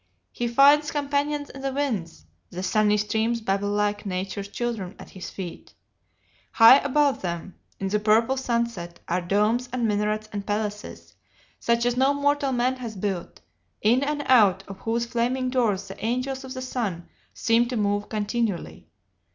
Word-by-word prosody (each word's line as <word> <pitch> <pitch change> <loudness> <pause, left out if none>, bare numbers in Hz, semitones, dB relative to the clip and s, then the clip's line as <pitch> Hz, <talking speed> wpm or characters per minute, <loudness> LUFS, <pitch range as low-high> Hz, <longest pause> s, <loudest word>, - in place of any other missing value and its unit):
He 240 - -2
finds 285 +5 +5
companions 290 0 -1
in 270 - -10
the 270 0 -2
winds 220 - -3 0.2
the 180 +1 -6
sunny 210 +2 +3
streams 220 +3 0
babble 205 -2 -1
like 205 0 0
Nature's 195 0 -4
children 205 -4 -4
at - - -12
his 185 - -8
feet; 180 -3 -8 0.8
high 230 +4 +9
above 285 0 +1
them, 175 +1 -4 0.3
in 195 - -2
the 210 +2 +1
purple 225 +4 +3
sunset, 235 -9 -2
are 180 +1 0
domes 210 +7 +1
and 245 -2 0
minarets 210 +1 -1
and 205 -1 -3
palaces, 210 0 -4 0.5
such 235 0 +1
as 245 0 +1
no 270 +2 +3
mortal 285 -1 +1
man 255 +1 +1
has 235 -4 -6
built, 190 -3 -4 0.4
in 235 +5 +4
and 290 0 -1
out 200 -7 +5
of 195 -1 -9
whose 230 +2 -1
flaming 250 +2 -1
doors 210 -7 +1
the 195 - -10
angels 255 +4 -2
of 260 0 -8
the 255 - -5
sun 210 -10 -3 0.3
seem 230 +1 +2
to 245 -1 -3
move 205 0 0
continually. 215 -2 -2
225 Hz, 160 wpm, -25 LUFS, 205-255 Hz, 0.8 s, high